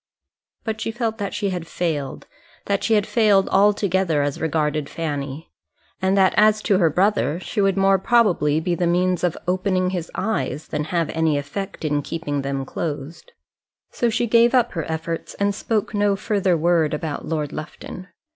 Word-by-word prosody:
But 220 -3 -3
she - - -2
felt 225 -1 -2
that 200 -1 -2
she 200 -2 -1
had 175 -3 -4
failed; 155 -7 -3 0.4
that 200 -1 0
she 225 - +3
had 205 -1 +2
failed 210 -4 +3
altogether 190 -6 +2
as 145 -1 -3
regarded 155 -2 0
Fanny; 145 -1 -4 0.5
and 190 +1 +2
that 190 -1 +4
as 215 0 +4
to 195 -2 +3
her 170 -3 +4
brother, 180 -2 +1
she 205 - -2
would 195 -1 +2
more 195 0 +4
probably 185 -9 +3
be 175 +2 -1
the 175 0 0
means 180 +1 +1
of 175 -2 0
opening 185 0 +1
his 175 -3 -4
eyes, 215 -8 -2
than 150 - -2
have 165 0 -1
any 160 -2 +1
effect 160 +6 -5
in 145 -1 +1
keeping 145 -2 -3
them 135 0 -3
closed. 155 - -6 0.6
So 240 - 0
she 235 +2 0
gave 235 +2 +4
up 240 -1 +3
her 165 -3 -4
efforts 165 +1 -4
and 200 0 0
spoke 215 +1 -2
no 205 -1 +2
further 195 -3 +1
word 165 -2 +2
about 150 -1 -5
Lord 150 -3 -2
Lufton. 180 +4 -8
180 Hz, 175 wpm, -22 LUFS, 155-205 Hz, 0.6 s, that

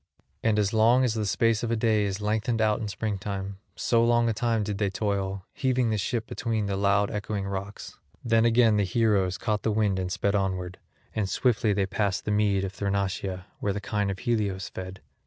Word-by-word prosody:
And 110 -2 +2
as 105 0 +1
long 115 +4 +5
as 125 -4 +2
the 110 -2 -1
space 115 +3 +2
of 120 - -2
a 115 - +1
day 110 -2 +2
is 100 0 -2
lengthened 110 +2 0
out 110 0 +2
in 110 - -3
springtime, 100 -1 -4 0.2
so 115 -1 +2
long 120 0 +3
a - - +1
time 115 0 0
did 100 -1 -3
they 100 -2 +1
toil, 100 -1 -2
heaving 130 -3 +1
the 110 - +1
ship 115 +3 -1
between 115 -3 -2
the 100 -1 -1
loud 100 +1 +2
echoing 105 -1 -3
rocks; 100 +1 -6 0.3
then 115 -1 +3
again 115 -2 +4
the 100 - +3
heroes 95 -2 +1
caught 105 -2 -1
the - - 0
wind 105 -3 +1
and 90 -1 -3
sped 100 +2 0
onward; 95 -2 -2 0.3
and 105 -3 -1
swiftly 115 -3 +2
they 100 -1 +1
passed 100 0 -1
the 105 - -1
mead 105 -2 +2
of 95 -1 -4
Thrinacia, 100 -2 -2
where 100 - -1
the 105 - -3
kine 105 0 -1
of 95 - -3
Helios 100 -5 -1
fed. 95 0 -8
105 Hz, 210 wpm, -27 LUFS, 100-110 Hz, 0.3 s, long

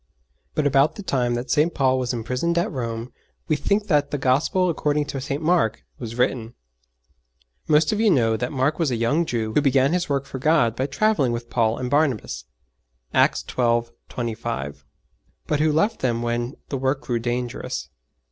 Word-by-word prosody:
But 155 - +1
about 140 +1 +3
the 205 - -7
time 125 -8 0
that 120 +3 -4
St. 160 +2 +3
Paul 130 -2 +2
was 125 -1 -1
imprisoned 125 +8 -1
at 185 +5 +1
Rome 115 -3 -4 0.3
we 155 - +2
think 200 +8 0
that 150 -7 +2
the 145 - -2
Gospel 145 +8 +2
according 150 -3 0
to 135 -2 -5
St. 140 +3 -3
Mark 160 -10 +2 0.2
was 115 -2 -6
written. 120 -2 -1 1.1
Most 150 0 +4
of 215 - -1
you 220 -1 +4
know 115 - +3
that 125 +3 -3
Mark 140 +3 0
was 165 -4 +2
a 125 - 0
young 145 +9 +1
Jew 110 -2 -2
who 150 - +4
began 135 +1 +3
his 180 -3 0
work 140 -1 0
for 135 - -7
God 150 -5 +3
by 130 +2 -1
travelling 145 - +1
with 120 0 -6
Paul 115 -2 +1
and 125 - -3
Barnabas 125 - 0 0.7
(Acts - - +3
xii. 120 -2 +2 0.3
25), 70 - -4 0.6
but 150 - 0
who 155 0 +3
left 165 +9 +1
them 120 -2 0
when 120 +2 -2
the 135 - -2
work 135 +2 0
grew 120 -4 -2
dangerous. 120 +1 -3
130 Hz, 185 wpm, -23 LUFS, 120-150 Hz, 1.1 s, Most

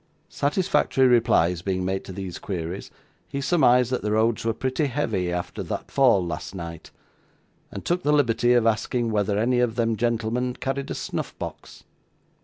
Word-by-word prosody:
Satisfactory 150 -3 +1
replies 90 -8 +3
being 95 0 -2
made 95 +1 -2
to - - -8
these 95 -1 -6
queries, 90 -1 -5 0.4
he 140 - -4
surmised 125 -5 +3
that 125 - 0
the 105 0 -1
roads 110 +1 +2
were 115 - +1
pretty 130 +5 -1
heavy 110 -10 -1
arter 90 0 -4
that - - -5
fall 120 -9 +4
last 85 +3 -5
night, 85 -2 -7 0.8
and - - -7
took 175 +1 0
the 150 - +1
liberty 120 -4 +3
of 120 -2 +3
asking 115 +1 0
whether 100 -1 +1
any 120 +3 +2
of 120 -2 +1
them 115 -2 +1
gentlemen 120 +2 -1
carried 135 +1 -3
a - - -3
snuff - - -4
box. - - -8
115 Hz, 170 wpm, -24 LUFS, 100-130 Hz, 0.8 s, fall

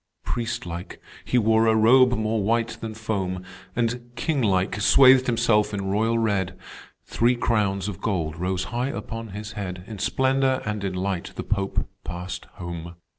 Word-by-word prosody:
"Priest 120 -3 -3
like, 85 +1 -7 0.2
he 125 - 0
wore 110 0 +4
a 110 - +4
robe 125 +3 +6
more 110 0 0
white 115 +2 +1
than 110 -1 -5
foam, 95 -5 -3 0.3
And, 120 0 -1
king 145 +2 0
like, 100 -1 +1
swathed 130 +4 +7
himself 115 -3 +2
in 100 -1 -3
royal 110 +3 +1
red, 100 -5 0 0.5
Three 120 +2 +2
crowns 105 -5 0
of 100 -5 -6
gold 85 -8 -1
rose 90 +2 -1
high 120 +2 0
upon 115 +1 -5
his 105 +1 -7
head; 90 -4 -5
In 110 -2 -8
splendor 130 +2 +1
and 105 -1 -3
in 95 -2 -2
light 95 -1 -2
the - - -4
Pope 100 -2 -1 0.2
passed 90 +1 -6
home. 85 -1 -7
110 Hz, 165 wpm, -24 LUFS, 95-115 Hz, 0.5 s, swathed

